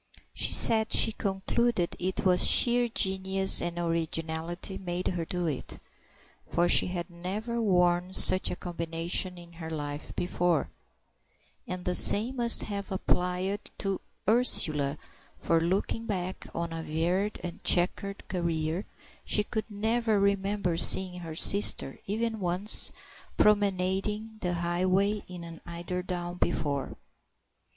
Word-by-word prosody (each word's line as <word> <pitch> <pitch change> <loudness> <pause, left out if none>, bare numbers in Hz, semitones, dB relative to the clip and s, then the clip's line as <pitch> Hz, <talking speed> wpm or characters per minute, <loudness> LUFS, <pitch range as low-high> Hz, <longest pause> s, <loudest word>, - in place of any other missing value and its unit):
She - - -2
said 220 -1 +3
she 225 - +4
concluded 195 0 -2
it 185 +2 -3
was 180 -1 +4
sheer 240 0 +5
genius 190 -3 +1
and 175 0 -5
originality 165 +2 -3
made 180 -1 -4
her 175 -2 -4
do 180 +1 -4
it, 150 -5 -5 0.7
for 175 +1 -1
she - - +4
had 180 -1 -5
never 210 +7 -5
worn 180 -3 +1
such 185 - +9
a - - -4
combination 170 +1 -3
in 170 -1 -14
her 165 -1 -9
life 145 -2 -6
before; 175 - -1 1.0
and 180 0 -7
the 180 - -1
same 230 +8 +7
must 235 -1 +4
have 200 -1 -7
applied 185 +2 -2
to 195 -2 -4 0.3
Ursula, 155 - +3 0.4
for, 165 -1 0
looking 195 +6 -2
back 185 -3 -5
on 170 0 -4
a 165 - -6
varied 175 +7 -2
and 175 -1 -8
chequered 195 +3 0
career, 170 0 -3 0.4
she 210 - -1
could 220 +1 -5
never 220 +1 -1
remember 200 -3 -1
seeing 180 +1 +2
her 165 -2 -8
sister, 195 -6 +2
even 220 +2 -3
once, 185 +3 +4 0.5
promenading 205 +2 0
the 180 -1 -2
highway 185 +4 -1
in 180 -1 -10
an 165 -1 -11
eiderdown 175 +1 -6
before. 140 -3 -3
180 Hz, 130 wpm, -27 LUFS, 170-200 Hz, 1.0 s, such